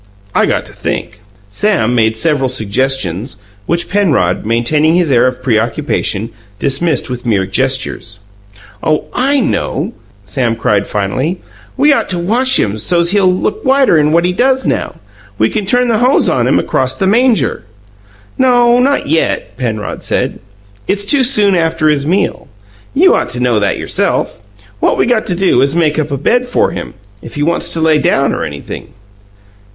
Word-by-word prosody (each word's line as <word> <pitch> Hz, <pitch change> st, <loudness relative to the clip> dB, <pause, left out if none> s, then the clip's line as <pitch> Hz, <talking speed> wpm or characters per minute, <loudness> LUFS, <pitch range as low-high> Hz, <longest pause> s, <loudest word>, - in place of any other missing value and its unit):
I -, -, +2 dB
got -, -, -1 dB
to -, -, -13 dB
think." 105 Hz, -, -5 dB, 0.3 s
Sam 120 Hz, -, 0 dB
made 110 Hz, -2 st, +2 dB
several 140 Hz, 0 st, +1 dB
suggestions, 125 Hz, -3 st, -1 dB, 0.3 s
which 170 Hz, +1 st, -1 dB
Penrod 145 Hz, -, 0 dB
maintaining 150 Hz, +8 st, +1 dB
his 175 Hz, -5 st, +1 dB
air 125 Hz, 0 st, +4 dB
of 125 Hz, 0 st, -4 dB
preoccupation 115 Hz, -2 st, -1 dB, 0.3 s
dismissed 145 Hz, +7 st, -1 dB
with 125 Hz, -1 st, -6 dB
mere 100 Hz, -4 st, +1 dB
gestures. 125 Hz, -1 st, -2 dB, 0.6 s
"Oh, 155 Hz, -1 st, 0 dB
I 275 Hz, +3 st, +1 dB
know!" 245 Hz, -, -2 dB, 0.3 s
Sam 115 Hz, +2 st, -1 dB
cried 105 Hz, -3 st, 0 dB
finally. 130 Hz, -, -2 dB, 0.4 s
"We 290 Hz, +2 st, +4 dB
ought -, -, -1 dB
to 180 Hz, -, -2 dB
wash 240 Hz, +9 st, +1 dB
him 105 Hz, +1 st, -1 dB
so's 170 Hz, +7 st, +2 dB
he'll 195 Hz, -2 st, +3 dB
look 185 Hz, -, -2 dB
whiter'n 260 Hz, -, +3 dB
what 170 Hz, +2 st, +2 dB
he 180 Hz, -, 0 dB
does 260 Hz, +5 st, +1 dB
now. -, -, -2 dB, 0.4 s
We 110 Hz, +2 st, +1 dB
can 210 Hz, -3 st, -3 dB
turn 245 Hz, +3 st, +2 dB
the 225 Hz, -2 st, +1 dB
hose 255 Hz, +3 st, +3 dB
on -, -, +1 dB
him -, -, +3 dB
across -, -, -1 dB
the 195 Hz, -, -1 dB
manger." 220 Hz, -, +1 dB, 0.8 s
"No; 245 Hz, -2 st, +4 dB
not 275 Hz, +3 st, +1 dB
yet," 160 Hz, +3 st, -1 dB
Penrod 110 Hz, -5 st, -4 dB
said. -, -, -2 dB, 0.5 s
"It's 205 Hz, 0 st, 0 dB
too 270 Hz, +5 st, +3 dB
soon 210 Hz, -6 st, +4 dB
after 165 Hz, -2 st, +1 dB
his 145 Hz, -1 st, 0 dB
meal. 185 Hz, +2 st, -1 dB, 0.5 s
You 365 Hz, +7 st, +5 dB
ought -, -, 0 dB
to 120 Hz, 0 st, -3 dB
know 125 Hz, -3 st, +1 dB
that 100 Hz, -2 st, 0 dB
yourself. -, -, -1 dB, 0.4 s
What -, -, +1 dB
we -, -, +2 dB
got 240 Hz, -2 st, 0 dB
to 180 Hz, -, 0 dB
do 180 Hz, -9 st, +2 dB
is 140 Hz, +1 st, +2 dB
to -, -, -2 dB
make 155 Hz, -2 st, +1 dB
up 155 Hz, -1 st, -2 dB
a 140 Hz, -, -2 dB
bed 245 Hz, -, +1 dB
for 245 Hz, -, +1 dB
him -, -, -7 dB, 0.3 s
if 115 Hz, -, -10 dB
he 145 Hz, -, -1 dB
wants 170 Hz, +3 st, +1 dB
to 165 Hz, -, -2 dB
lay 160 Hz, -1 st, +3 dB
down -, -, +1 dB
or -, -, -3 dB
anything." 70 Hz, -1 st, -8 dB
155 Hz, 175 wpm, -13 LUFS, -, 0.8 s, You